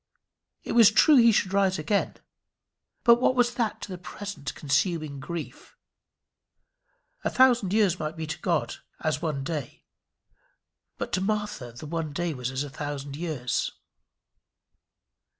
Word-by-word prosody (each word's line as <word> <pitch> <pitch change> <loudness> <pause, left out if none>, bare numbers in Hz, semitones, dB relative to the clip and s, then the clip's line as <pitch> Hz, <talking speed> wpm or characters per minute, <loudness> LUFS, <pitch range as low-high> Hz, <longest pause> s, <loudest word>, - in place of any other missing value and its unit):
It - - -5
was 230 -3 +7
true 285 +7 +6
he 235 -1 +7
should 195 -2 +1
rise 195 -1 +2
again; 195 +7 -1 0.9
but 235 0 +6
what 255 - +3
was 245 -1 +3
that 235 -3 -2
to - - -7
the 180 - -6
present 175 -6 -7
consuming 150 0 -1
grief? 165 +3 -7 1.5
A - - +1
thousand 245 -7 +4
years 200 -4 +2
might 155 +2 -4
be 160 - -3
to 155 - -5
God 170 -4 -1 0.2
as 155 -1 -1
one 150 -5 -2
day, 145 -4 -5 1.1
but - - -5
to 185 - +1
Martha 210 - -2
the 120 +6 -9
one 160 -1 -3
day 175 +1 -1
was 130 +1 -3
a - - -6
thousand 145 -1 -5
years. 150 -6 -2
170 Hz, 140 wpm, -27 LUFS, 145-205 Hz, 1.5 s, was